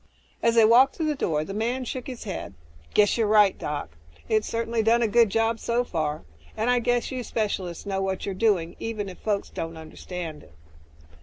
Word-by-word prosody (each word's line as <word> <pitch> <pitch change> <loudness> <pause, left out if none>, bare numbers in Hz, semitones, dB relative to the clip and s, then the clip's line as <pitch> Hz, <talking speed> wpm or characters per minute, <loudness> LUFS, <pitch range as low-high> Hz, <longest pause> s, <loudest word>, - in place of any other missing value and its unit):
As 230 0 +3
they 225 -1 +7
walked 240 +4 +6
to 325 - -3
the 305 -1 +1
door, 155 - -1
the 195 - -6
man 240 +5 -1
shook 250 +1 -5
his 250 -3 -7
head, 200 -5 -6 0.4
"Guess 210 +2 +4
you're 220 - +3
right, 210 -2 +5
Doc. 145 - -4 0.4
It's 215 -1 +1
certainly 230 0 -1
done 230 +2 +3
a - - +3
good 230 0 +4
job 225 +2 +1
so 235 +1 0
far, 155 -8 -2 0.3
and 230 +3 +1
I 250 - +3
guess 245 +1 0
you 255 -1 -3
specialists 200 -7 -3
know 195 -1 -1
what 190 -1 -2
you're 200 - -2
doing, 185 -5 +1
even 215 -3 -4
if 185 - -11
folks 205 -2 -2
don't 165 0 -5
understand 160 0 -7
it." - - -19
215 Hz, 205 wpm, -25 LUFS, 185-235 Hz, 0.4 s, they